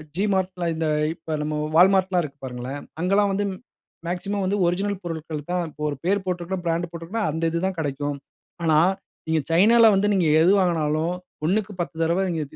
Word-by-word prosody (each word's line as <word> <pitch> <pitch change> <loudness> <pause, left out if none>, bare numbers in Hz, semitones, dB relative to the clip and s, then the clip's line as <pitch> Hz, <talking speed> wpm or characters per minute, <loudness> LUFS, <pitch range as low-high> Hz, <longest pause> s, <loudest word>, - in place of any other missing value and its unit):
G 200 +4 +1
Mart 190 -1 +1 0.3
இந்த 160 0 -1 0.3
இப்போ 160 -1 -6
நம்ம 150 0 -2 0.2
Walmart 190 +1 +6
எல்லாம் 180 -2 +1
இருக்கு 140 -2 -9
பாருங்களேன், 130 +3 -6 0.2
அங்கலாம் 195 +2 +2
வந்து 205 +1 0 0.6
மேக்ஸிமம் 195 +3 -2
வந்து 200 +2 0
ஒரிஜினல் 195 +3 -1
பொருட்கள் 160 -3 -5
தான் 180 -1 0
இப்போ 150 0 -14
ஒரு 145 - -3
பேர் 195 +1 +1
போட்டிருக்கு, 180 0 -3
பிராண்ட் 170 +1 -1
போட்டிருக்குனா, 170 +7 -4
அந்த 160 +2 -4
இது 170 - -1
தான் 190 - -4
கிடைக்கும், 145 -1 -2 0.5
ஆனா 155 -2 +4 0.5
நீங்க 160 0 +2
சைனாவில 225 +7 +6
வந்து 195 +1 +2
நீங்க 185 -3 +2 0.2
எது 175 +3 +5
வாங்கினாலும் 165 -2 +1 0.3
ஒன்னுக்கு 205 +5 0
பத்து 175 -1 -3
தடவை 170 +3 +2
நீங்க 165 -2 -1
175 Hz, 175 wpm, -24 LUFS, 160-190 Hz, 0.6 s, Walmart